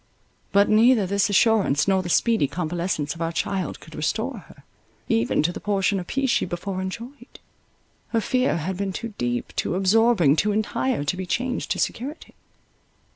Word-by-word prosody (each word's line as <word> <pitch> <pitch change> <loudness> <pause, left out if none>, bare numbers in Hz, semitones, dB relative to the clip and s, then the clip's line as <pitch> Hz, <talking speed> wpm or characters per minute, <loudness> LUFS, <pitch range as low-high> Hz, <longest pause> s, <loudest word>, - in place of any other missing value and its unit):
But 200 +1 +4
neither 225 0 +5
this 200 +2 +1
assurance, 200 -8 +3
nor 190 -1 +3
the 175 - -6
speedy 225 -4 +2
convalescence 165 0 -2
of 170 - -10
our 165 0 -1
child 185 0 -2
could - - -14
restore - - -2
her, - - -17 0.4
even 115 +5 +1
to 175 +3 0
the - - -6
portion 200 -1 0
of 175 - -7
peace 270 -2 0
she - - +2
before 185 +2 -4
enjoyed. 240 +8 -8 0.7
Her 230 - 0
fear 255 -3 +1
had 175 +3 -3
been 195 -1 -2
too 230 +2 -6
deep, 120 0 -2
too - - -1
absorbing, 195 -5 +4
too 210 +4 +2
entire, 215 - -1
to 145 +5 -1
be 185 0 -5
changed 250 +7 -2
to - - 0
security. 275 +7 -4
195 Hz, 175 wpm, -24 LUFS, 175-225 Hz, 0.7 s, neither